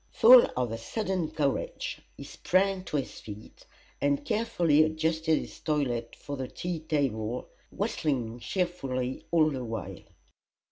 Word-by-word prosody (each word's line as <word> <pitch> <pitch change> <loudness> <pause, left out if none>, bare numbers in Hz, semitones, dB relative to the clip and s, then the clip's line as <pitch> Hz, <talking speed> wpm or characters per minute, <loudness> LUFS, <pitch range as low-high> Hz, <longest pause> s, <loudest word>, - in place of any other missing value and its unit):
Full 245 +1 +8
of 125 -3 0
a 115 - -4
sudden 185 - -2
courage 160 - -2 0.2
he - - -8
sprang 190 0 0
to 150 - -2
his 135 - -4
feet, 105 0 -11 0.3
and 140 0 +1
carefully 175 -9 +2
adjusted 160 0 +1
his - - -7
toilet 125 -7 -1
for 145 - -6
the 130 -1 -4
tea 175 +3 -4
table, 125 -7 -2 0.2
whistling 125 -6 -2
cheerfully 135 -7 -2
all 155 -2 +4
the 130 -3 -4
while. 115 -1 -5
150 Hz, 135 wpm, -28 LUFS, 125-175 Hz, 0.3 s, Full